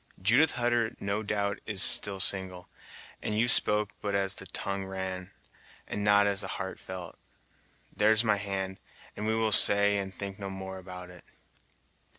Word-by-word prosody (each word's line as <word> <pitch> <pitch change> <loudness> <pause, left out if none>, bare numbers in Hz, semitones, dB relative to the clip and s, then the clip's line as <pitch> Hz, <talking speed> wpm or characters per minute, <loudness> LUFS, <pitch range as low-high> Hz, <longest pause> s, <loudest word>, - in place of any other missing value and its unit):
Judith 120 +11 +2
Hutter 120 -2 -1
no 100 +2 -3
doubt 100 -1 -3
is 105 -4 +4
still 100 -1 +4
single, 95 -2 +2 0.5
and 105 - -4
you 115 +3 +1
spoke 105 -3 +3
but 100 -1 -3
as 95 -1 -1
the - - -9
tongue 100 -1 -5
ran, 95 -1 -6 0.6
and 105 - -5
not 105 0 +4
as 100 -1 0
the 95 - -6
heart 95 0 -6
felt. 90 -2 -10 0.8
There's 110 +2 +2
my 110 -3 +1
hand, 95 -1 -5 0.4
and 105 - -5
we 110 - 0
will 110 -1 -1
say 100 0 +7
and 95 -1 -6
think 100 +1 -8
no 100 -1 -6
more 95 0 -8
about 90 -1 -11
it." 90 - -16
100 Hz, 165 wpm, -28 LUFS, 95-105 Hz, 0.8 s, say